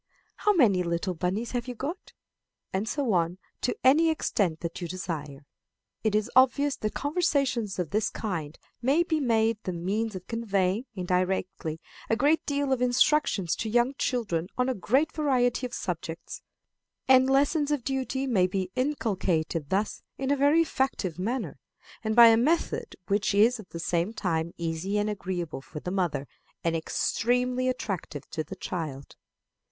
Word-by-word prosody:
How 420 - +3
many 220 - +4
little 170 +2 -1
bunnies 185 +7 -2
have 245 0 -2
you 250 - -5
got?'" 300 +10 -6 0.6
And 200 +4 -1
so 275 -7 0
on, 170 0 +1 0.2
to 250 - -1
any 310 +6 +5
extent 195 - 0
that 170 +1 -5
you 175 - -3
desire. 155 -6 -5 0.6
It 215 -2 +1
is 215 0 0
obvious 270 +2 +4
that 215 - -3
conversations 280 - 0
of 175 -5 -2
this 215 +1 +1
kind 165 -8 -4 0.2
may 275 +7 +3
be 320 -2 0
made 225 -4 +2
the 185 - -3
means 200 +5 -2
of 185 -1 -7
conveying, 205 -1 0
indirectly, 180 -3 -1 0.3
a 225 - +3
great 295 +7 +3
deal 285 -1 +1
of 255 - -1
instruction 250 -4 +3
to 195 +7 -1
young 240 +4 +2
children 210 -12 -1
on 250 +1 +2
a - - +1
great 265 +9 +1
variety 255 -4 +1
of - - -17
subjects; 165 -2 -5 0.7
and 260 0 +6
lessons 285 +2 +3
of 295 -4 0
duty 265 0 -2
may 200 -9 +3
be 185 0 -3
inculcated 185 - -1
thus 200 +3 -1 0.2
in 270 0 -1
a - - +4
very 290 +4 +4
effective 260 - -2
manner, 210 - -3 0.4
and 220 -1 0
by 235 -1 +10
a 225 - +5
method 305 +9 0
which 200 +1 +1
is 230 +4 +4
at 210 - -11
the - - -7
same 175 +4 0
time 170 -5 -1
easy 170 +4 -2
and 210 +1 +1
agreeable 180 -7 -4
for 150 - -8
the 180 - -5
mother, 175 -7 -1 0.4
and 165 -1 +1
extremely 250 +9 0
attractive 195 - -4
to 155 - -2
the 190 - -8
child. 155 -7 -5
215 Hz, 165 wpm, -27 LUFS, 180-260 Hz, 0.7 s, by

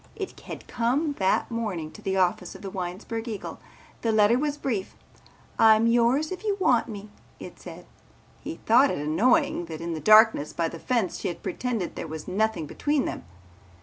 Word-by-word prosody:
It 390 -3 -6
had - - -9
come 265 +6 0
that 190 +4 +1
morning 195 -9 -3
to - - -13
the 190 0 -1
office 180 -1 0
of - - -12
the 195 - -6
Winesburg 195 +6 -5
Eagle. 215 -4 -6 0.4
The 230 - +1
letter 215 +3 +4
was 295 0 -1
brief. 220 -10 -3 0.6
"I'm 220 0 +6
yours 240 +7 +2
if 370 - -6
you 410 -2 0
want 245 -10 +3
me," 205 -1 -8 0.3
it - - -10
said. - - -10 0.5
He 320 - -6
thought 255 +5 +5
it - - -2
annoying 170 - +2
that 160 -2 -7
in 170 0 -4
the 160 - -4
darkness 215 -3 +5
by 165 -1 -1
the 165 - -9
fence 230 -5 -1
she - - -3
had 175 - -6
pretended 215 0 -3
there - - -5
was 155 0 -7
nothing 215 -3 0
between 290 - -1
them. - - -5
220 Hz, 185 wpm, -26 LUFS, 180-245 Hz, 0.6 s, I'm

